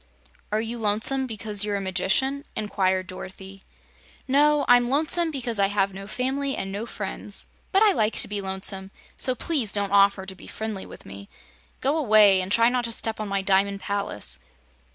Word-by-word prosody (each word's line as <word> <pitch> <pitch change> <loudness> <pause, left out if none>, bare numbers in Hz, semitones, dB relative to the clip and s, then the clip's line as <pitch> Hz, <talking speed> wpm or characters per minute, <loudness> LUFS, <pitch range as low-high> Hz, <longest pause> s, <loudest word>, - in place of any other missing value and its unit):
"Are 215 +1 +1
you 230 +1 -5
lonesome 225 +5 +1
because 210 -2 -2
you're 205 -1 -2
a - - -1
magician?" 195 +9 0
inquired 190 -3 0
Dorothy. 190 +1 -10 0.7
"No; 295 +2 +3
I'm 245 0 +5
lonesome 320 +4 +2
because 245 -7 -2
I 195 - +4
have 195 -1 0
no 195 +1 -8
family 270 +4 -2
and 195 0 -4
no 205 +4 -5
friends. 205 -1 -4 0.3
But 390 +2 +4
I 425 - +6
like 220 - 0
to - - +1
be 205 -1 -3
lonesome, 190 0 -4 0.3
so 255 - +3
please 260 -8 -1
don't 200 -1 -2
offer 200 -1 +4
to 190 - -7
be 190 - -14
friendly 220 -3 -5
with - - -13
me. 100 +1 -11 0.5
Go 275 +3 +1
away, 215 -8 +5
and 185 +1 -5
try 230 +2 +4
not 245 0 0
to 230 - -3
step 225 -1 -2
on 215 - -3
my 195 -1 -1
Diamond 195 +1 +2
Palace." 200 - 0
210 Hz, 185 wpm, -25 LUFS, 195-250 Hz, 0.7 s, I